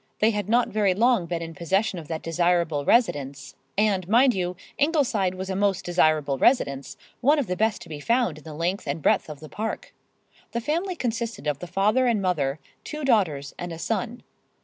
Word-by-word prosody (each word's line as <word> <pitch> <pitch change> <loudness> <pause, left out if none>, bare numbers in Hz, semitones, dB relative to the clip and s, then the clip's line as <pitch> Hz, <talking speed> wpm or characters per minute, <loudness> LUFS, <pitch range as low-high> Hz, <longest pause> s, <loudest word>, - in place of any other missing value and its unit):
They 220 +2 +3
had 205 -2 -3
not 240 +2 +3
very 205 -3 +2
long 230 -4 +3
been 170 -1 -3
in 165 0 -7
possession 190 +4 0
of 155 - -10
that 160 0 -4
desirable 165 -3 +1
residence, 140 - +1 0.2
and, 200 -4 +2
mind 245 +4 +5
you, 180 -2 -2 0.2
Ingleside 270 - +1
was 190 +1 -5
a - - -2
most 195 -1 0
desirable 155 -6 +2
residence, 140 - +1 0.2
one 290 +5 +4
of 285 - +1
the 180 -2 -2
best 220 +2 0
to 170 - -15
be 150 -2 -6
found 230 - +1
in - - -18
the 155 -2 -9
length 170 +3 -2
and 140 +3 -2
breadth - - +2
of 150 -2 -8
the 155 - -9
[Pg - - -16 0.2
111]Park. - - -21 0.7
The 235 - -1
family 340 - -1
consisted 235 - -3
of 145 -2 -1
the 180 - -7
father 210 +8 +2
and 230 -3 +2
mother, 155 -7 0 0.3
two 300 -1 -5
daughters 160 - +1
and 175 0 -5
a 165 - -6
son. 230 +6 -3
185 Hz, 205 wpm, -25 LUFS, 160-230 Hz, 0.7 s, mind